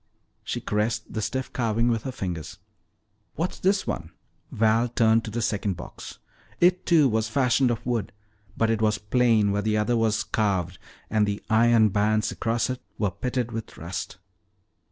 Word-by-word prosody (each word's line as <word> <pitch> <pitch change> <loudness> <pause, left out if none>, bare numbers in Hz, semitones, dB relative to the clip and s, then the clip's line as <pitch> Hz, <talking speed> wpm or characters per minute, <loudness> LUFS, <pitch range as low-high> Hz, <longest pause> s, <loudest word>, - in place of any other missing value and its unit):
She - - -3
caressed 105 +2 -2
the 110 - -2
stiff 130 +4 -3
carving 115 -1 +1
with 115 -2 +1
her 130 - -2
fingers. 90 -9 -5 0.8
"What's 170 +4 -3
this 195 +1 +2
one?" 85 -1 -4 0.4
Val 110 +2 +2
turned 115 -1 +3
to - - -5
the 115 +2 -2
second 100 -4 -1
box. - - -9 0.4
It, 180 +1 +3
too, 160 -5 +5
was 110 -2 0
fashioned 130 +1 +2
of 120 - -3
wood, 115 -5 -1 0.5
but 115 0 +2
it 110 -1 0
was 110 -1 +2
plain 110 -1 +2
where 100 +1 0
the 110 +1 0
other 105 +3 +1
was 110 -2 +1
carved, 95 -5 -1 0.3
and 105 -1 +2
the 100 0 -3
iron 115 -1 +5
bands 105 +2 +1
across 115 0 -1
it 130 -1 -4 0.2
were 105 -3 0
pitted 125 +4 -3
with 115 -1 -6
rust. 85 +3 -6
110 Hz, 170 wpm, -25 LUFS, 105-120 Hz, 0.8 s, too